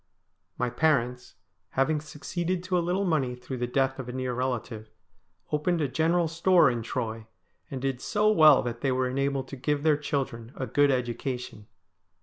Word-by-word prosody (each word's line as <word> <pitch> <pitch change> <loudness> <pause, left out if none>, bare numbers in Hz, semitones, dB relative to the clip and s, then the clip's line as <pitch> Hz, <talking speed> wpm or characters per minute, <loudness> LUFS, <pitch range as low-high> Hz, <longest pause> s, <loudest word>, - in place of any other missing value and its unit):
My 125 0 -1
parents, 125 -3 0 0.4
having 150 +3 +2
succeeded 175 +4 -3
to 185 0 -1
a 175 - +3
little 180 +4 0
money 135 -8 0
through 125 +1 -7
the 120 - -1
death 135 +1 0
of 125 -2 -6
a - - -3
near 130 0 -3
relative, 120 -3 -3 0.6
opened 160 +3 +1
a 150 - +1
general 165 +5 +1
store 170 -2 +4
in 120 -1 -3
Troy, 115 -2 -4 0.4
and 135 - -5
did 135 -2 -2
so 215 0 +2
well 155 -8 +7
that 120 -1 -4
they 135 - +1
were 130 0 +1
enabled 135 +1 -1
to - - -6
give 145 +2 -1
their 155 -2 +4
children 135 -5 -3
a 130 - -3
good 145 +5 +3
education. 125 -3 -3
135 Hz, 175 wpm, -27 LUFS, 125-155 Hz, 0.6 s, well